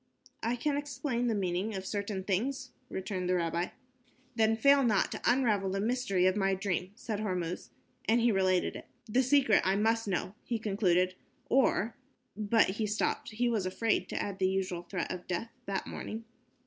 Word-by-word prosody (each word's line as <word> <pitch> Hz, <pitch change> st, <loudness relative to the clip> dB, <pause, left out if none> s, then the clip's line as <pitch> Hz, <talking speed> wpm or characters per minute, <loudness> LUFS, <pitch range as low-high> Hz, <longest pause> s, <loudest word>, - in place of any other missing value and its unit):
"I 230 Hz, +2 st, 0 dB
can 285 Hz, +4 st, 0 dB
explain 265 Hz, -4 st, -2 dB
the 225 Hz, -, +1 dB
meaning 190 Hz, +2 st, -1 dB
of 190 Hz, 0 st, -4 dB
certain 200 Hz, -1 st, -3 dB
things," 255 Hz, +7 st, -1 dB, 0.2 s
returned 185 Hz, -1 st, -3 dB
the 185 Hz, -, +3 dB
rabbi. 170 Hz, 0 st, 0 dB, 0.7 s
"Then 225 Hz, -1 st, +3 dB
fail 280 Hz, +4 st, +6 dB
not 215 Hz, -5 st, +2 dB
to -, -, -5 dB
unravel 225 Hz, -6 st, +3 dB
the 195 Hz, +1 st, -1 dB
mystery 215 Hz, -4 st, +1 dB
of 185 Hz, 0 st, +4 dB
my 195 Hz, -2 st, +2 dB
dream," 185 Hz, -1 st, -2 dB
said 220 Hz, -3 st, -4 dB
Hormuz, 180 Hz, -5 st, -3 dB, 0.4 s
and 230 Hz, +2 st, +5 dB
he 235 Hz, 0 st, +4 dB
related 185 Hz, -2 st, +2 dB
it. -, -, -9 dB, 0.2 s
"The 245 Hz, +3 st, +2 dB
secret 265 Hz, -4 st, +4 dB
I 190 Hz, +1 st, +2 dB
must 225 Hz, +2 st, +1 dB
know," 185 Hz, 0 st, -1 dB
he 235 Hz, -, -1 dB
concluded, 185 Hz, -4 st, +2 dB, 0.4 s
"or 235 Hz, -4 st, +3 dB, 0.2 s
." 250 Hz, -, -47 dB
But 215 Hz, +2 st, +3 dB
he 220 Hz, -, 0 dB
stopped. 215 Hz, +2 st, -1 dB
He 240 Hz, +3 st, 0 dB
was 215 Hz, -6 st, 0 dB
afraid 225 Hz, +4 st, 0 dB
to -, -, -2 dB
add 200 Hz, -1 st, -3 dB
the 185 Hz, -1 st, +3 dB
usual 190 Hz, -2 st, -1 dB
threat 175 Hz, 0 st, -4 dB
of 180 Hz, -1 st, -6 dB
death 185 Hz, +6 st, -3 dB, 0.2 s
that 195 Hz, -1 st, -2 dB
morning. 225 Hz, +1 st, -6 dB
210 Hz, 185 wpm, -31 LUFS, 185-235 Hz, 0.7 s, fail